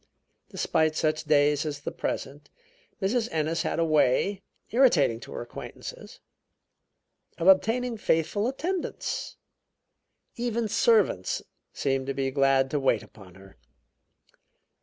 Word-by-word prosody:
Despite 155 -1 0
such 155 0 0
days 145 -1 +3
as 145 -2 -5
the - - -4
present, 140 +2 -5 0.5
Mrs. 225 +4 0
Ennis 160 +1 0
had - - -2
a 165 - +2
way, 155 +6 +2 0.3
irritating 220 - +4
to - - -11
her - - -5
acquaintances, 120 - -9 1.2
of 170 - -1
obtaining 230 +5 +3
faithful 190 +3 0
attendance. 345 +8 -3 1.0
Even 235 -1 -1
servants 210 - +2 0.3
seemed 135 -1 -1
to 135 - -2
be 135 -1 -1
glad 135 -1 +2
to 145 - 0
wait 130 -5 +1
upon 95 -5 -16
her. 95 0 -16
155 Hz, 115 wpm, -27 LUFS, 135-215 Hz, 1.2 s, irritating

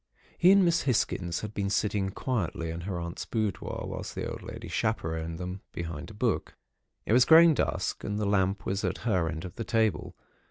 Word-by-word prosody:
"He 180 +2 +6
and 195 -1 +6
Miss 170 -1 +3
Hisgins 95 -8 0
had 105 -1 -6
been 100 -2 -1
sitting 100 -1 0
quietly 95 -7 -2
in 85 +1 -5
her 90 +1 -4
aunt's 85 0 -5
boudoir, 110 -5 -2
whilst - - -6
the - - -3
old - - -6
lady - - -8
chaperoned 80 0 -2
them, 90 +2 -5
behind 85 -3 -5
a - - -11
book. - - -1 0.5
It - - +1
was 125 +1 +7
growing 165 +3 +8
dusk, - - -1
and 105 0 -2
the 105 - -1
lamp 100 -1 +1
was 95 +2 -1
at 95 +3 -2
her 90 -7 +2
end 80 +1 -5
of 90 - -9
the 115 - -2
table. 110 -2 0
100 Hz, 200 wpm, -29 LUFS, 85-110 Hz, 0.5 s, growing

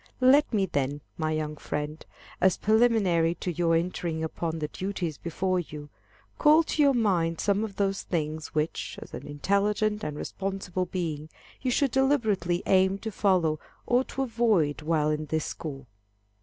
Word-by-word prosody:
Let 270 +3 +5
me, 205 -4 +2
then, 145 -3 -2
my 155 -1 -1
young 155 -1 -2
friend, 150 +2 -4 0.4
as 190 -1 +4
preliminary 205 -7 +3
to 180 - -3
your 170 -1 +2
entering 165 -1 -1
upon 160 0 -3
the 155 -1 -2
duties 180 -3 -4
before 185 +2 -1
you, 150 -3 -7 0.5
call 310 +2 +6
to 310 - -1
your 280 -2 +5
mind 175 -8 +1
some 200 +1 +1
of 210 -3 -5
those 195 -1 0
things, 155 -2 -3
which, 155 +1 -2
as - - -12
an - - -7
intelligent 205 +7 0
and 150 -1 -4
responsible 190 -1 -3
being, 160 -4 -3 0.3
you 255 - 0
should 270 +1 +2
deliberately 220 -11 +1
aim 190 +1 +3
to 220 +2 -5
follow 180 -7 +2 0.3
or 245 +1 +3
to 270 - -3
avoid 220 - +1
while 155 -1 +1
in 155 0 -2
this 155 +1 -1
school. 140 -4 -6
180 Hz, 160 wpm, -27 LUFS, 155-210 Hz, 0.5 s, call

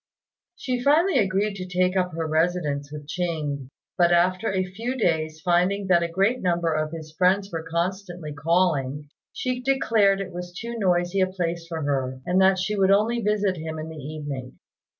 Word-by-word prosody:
She 250 -6 -2
finally 305 +3 +4
agreed 200 0 +1
to 185 -1 -6
take 180 0 +1
up 180 -2 0
her 165 0 -2
residence 155 -3 0
with 150 -1 -8
Ching; 150 -6 -3 0.3
but 175 -1 +5
after 185 +4 +2
a 190 -1 0
few 230 +8 -4
days, 160 -7 0
finding 180 +3 +2
that 175 -2 +5
a 170 - 0
great 195 +9 +1
number 170 -2 +1
of 155 0 -1
his 160 -2 -8
friends 195 +3 +2
were 165 -1 -3
constantly 175 0 -3
calling, 150 -3 0 0.2
she 255 -1 -3
declared 225 -7 +3
it 185 -2 -5
was 175 0 -7
too 235 +1 -5
noisy 175 -1 +1
a 185 - +4
place 170 -2 -3
for 165 -2 -4
her, 130 -2 -1
and 180 +2 +2
that 190 0 +5
she 195 +3 -1
would 195 -1 +3
only 220 +4 +3
visit 205 -3 +1
him 160 0 -5
in 155 +1 -5
the 160 - -9
evening. 145 -4 -6
180 Hz, 185 wpm, -25 LUFS, 160-195 Hz, 0.3 s, but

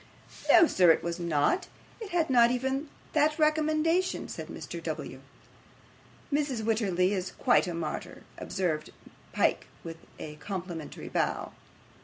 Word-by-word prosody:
'No, 345 -1 +8
sir, 180 - +4
it 165 - +4
was 170 +1 -3
not. 170 - +1 0.3
It 440 -3 -7
had 340 -3 +1
not 240 -2 +6
even 265 +4 -1 0.2
that 305 0 +3
recommendation,' 310 +3 +1
said - - -6
Mr. - - -7
W. - - -5 1.1
'Mrs. 280 -6 0
Wititterly 200 -4 +1
is 185 -2 -2
quite 245 -6 +3
a 175 - -3
martyr,' 160 -2 -5 0.2
observed 165 -6 -2 0.4
Pyke, - - +1 0.2
with 165 -1 -7 0.2
a 150 -1 -8
complimentary 175 -3 -6
bow. - - -1
225 Hz, 130 wpm, -29 LUFS, -, 1.1 s, No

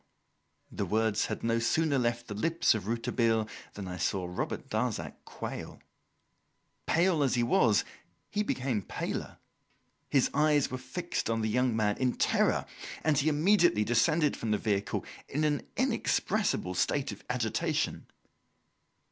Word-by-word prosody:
The - - -3
words 110 -1 +1
had - - -5
no 115 0 +2
sooner 145 +4 +2
left 120 -1 0
the 105 - -5
lips 165 +11 +2
of 105 -3 -4
Rouletabille 115 -1 +1 0.3
than 100 -2 -6
I 90 0 -5
saw 95 0 -1
Robert 90 +1 -4
Darzac 110 -9 -2
quail. - - -7 1.1
Pale 170 -1 +3
as 135 -3 +2
he 120 - +2
was, 115 -3 +3 0.5
he 210 - 0
became 130 - -1
paler. - - -4 0.7
His 135 -3 +3
eyes 150 -1 +3
were 130 - -3
fixed 130 +3 -3
on 115 0 0
the 110 - 0
young 125 +1 +1
man 105 -2 +1
in 130 -1 +2
terror, - - +2 0.4
and 150 -4 +3
he 150 - +2
immediately 170 - +4
descended 135 +7 +2
from 115 - -4
the 105 - +2
vehicle 100 -1 -1 0.2
in 150 +3 -1
an 145 -3 0
inexpressible 90 - 0
state 140 +9 0
of - - -10
agitation. 120 -3 -1
120 Hz, 145 wpm, -30 LUFS, 110-145 Hz, 1.1 s, immediately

